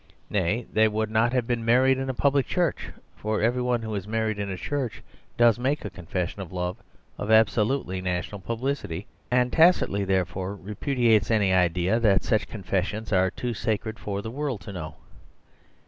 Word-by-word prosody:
Nay, 105 +4 0
they 110 0 +5
would 110 0 -1
not 115 +2 +3
have 125 -2 +1
been 120 -1 -1
married 130 +3 +4
in 135 0 -3
a - - 0
public 140 +1 +2
church, 175 -4 -1 0.3
for 110 0 -2
every 120 +3 +1
one 125 -2 0
who 110 -1 -4
is 100 -1 -4
married 110 -1 -1
in 100 -1 -2
a 95 - -4
church 130 +3 -3 0.3
does 120 -1 +5
make 135 +2 -1
a 105 - -4
confession 90 +1 -4
of 90 - -8
love 90 +1 -3 0.4
of 105 - -4
absolutely 110 -2 +2
national 90 +2 -3
publicity, 115 - -3 0.2
and 125 0 +2
tacitly, 160 - +4
therefore, 95 0 -1
repudiates 110 +1 +1
any 105 -4 +3
idea 90 +4 +2
that 100 -5 +3
such 110 -3 +1
confessions 105 +2 -3
are 95 0 +4
too 120 +5 -4
sacred 110 0 -2
for 100 -1 -4
the 110 - -5
world 135 -4 -3
to 100 - -8
know. 80 -5 -6
110 Hz, 180 wpm, -26 LUFS, 95-120 Hz, 0.4 s, they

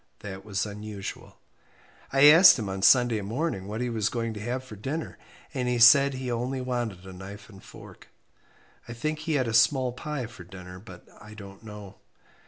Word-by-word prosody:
That 95 -1 -8
was 100 -1 -2
unusual. 105 -1 -8 0.7
I 135 0 +3
asked 165 +3 +8
him 105 -5 -4
on 95 0 -5
Sunday 120 0 +4
morning 110 - -3
what 110 +3 -5
he 125 - -2
was 110 -2 -1
going 115 -2 -3
to 105 - -8
have 125 +4 -4
for 125 -5 -11
dinner, 135 +10 -6 0.3
and 130 -3 -2
he 125 0 0
said 135 +4 +6
he 130 -1 -4
only 125 +3 -3
wanted 120 -7 -4
a 95 - -10
knife 100 +4 -11
and 95 -3 -15
fork. - - -14 0.8
I 115 - -7
think 155 +6 -3
he 155 +1 -3
had 130 -4 0
a 115 - -3
small 130 +2 +3
pie 135 +1 -5
for 115 -5 -12
dinner, 90 0 -11
but 95 -3 -14
I 105 +1 -13
don't 100 -2 -12
know. 105 -3 -11
115 Hz, 190 wpm, -26 LUFS, 100-130 Hz, 0.8 s, asked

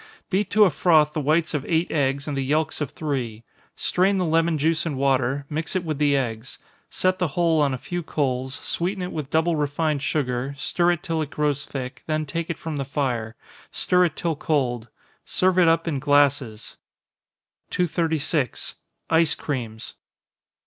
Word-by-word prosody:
Beat 195 +1 +1
to 210 +1 +5
a 190 - +5
froth 155 -4 +4
the 155 - -1
whites 155 +3 +1
of 145 -3 -1
eight 165 0 +1
eggs, 140 -1 0
and 145 - -2
the 135 - -1
yelks 155 +4 0
of 145 - -1
three 125 -8 -4 0.3
strain 195 +2 +2
the 185 - +1
lemon 165 0 +2
juice 160 +2 +1
and 155 -5 -3
water, 135 0 +1
mix 155 +5 -3
it 185 - 0
with 155 -4 -3
the 145 -1 +3
eggs 115 -2 -4 0.3
set 185 0 +1
the 180 - +2
whole 165 -3 +3
on 145 -2 +2
a 130 - -2
few 175 +7 -4
coals, 130 -4 -2
sweeten 185 +2 -2
it 180 - -4
with 150 -4 -4
double 160 +2 +2
refined 150 0 0
sugar, 135 -2 -1
stir 175 +5 +2
it 175 +1 -6
till 165 -3 -1
it 150 - -3
grows 150 -1 -1
thick, 130 -3 -6
then 155 -1 0
take 165 +3 -4
it 170 - -2
from 160 -2 -5
the 140 - -1
fire, 125 -5 -2 0.4
stir 180 0 +3
it 160 -3 -2
till 165 -2 -1
cold 125 -7 -1 0.4
serve 185 0 +2
it 175 - +6
up 165 +1 +3
in 145 -4 -1
glasses. 135 -6 +1 0.9
236. 160 -5 -1 0.3
_Ice 160 -2 +4
Creams. 115 -6 -5
150 Hz, 180 wpm, -24 LUFS, 135-165 Hz, 0.9 s, it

